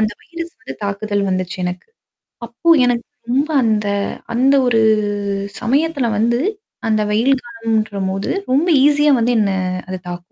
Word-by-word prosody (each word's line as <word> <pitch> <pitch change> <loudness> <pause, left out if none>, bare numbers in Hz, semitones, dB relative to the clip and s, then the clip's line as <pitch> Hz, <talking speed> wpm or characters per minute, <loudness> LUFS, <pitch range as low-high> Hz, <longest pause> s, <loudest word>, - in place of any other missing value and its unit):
அந்த 215 0 +2
வைரஸ் 335 0 -7
வந்து 135 - -8
தாக்குதல் 205 0 -1
வந்துச்சு 185 -1 -2
எனக்கு. 180 - -5 0.6
அப்போ 240 +9 -2 0.2
எனக்கு 245 -1 0 0.3
ரொம்ப 280 +5 +1
அந்த 215 -2 +1 0.5
அந்த 265 +4 +4
ஒரு 225 -2 +3 0.8
சமயத்துல 280 +1 +1
வந்து 235 +2 +2 0.5
அந்த 215 -1 +2
வெயில் 230 +6 +3
காலம்ன்றபோது 215 -4 -2 0.2
ரொம்ப 295 +7 +3 0.2
ஈஸியா 295 0 +4
வந்து 235 +2 +2
என்ன 200 -2 +2 0.4
அது 185 - -3
தாக்கும். 175 0 -8
230 Hz, 135 wpm, -18 LUFS, 205-265 Hz, 0.8 s, அந்த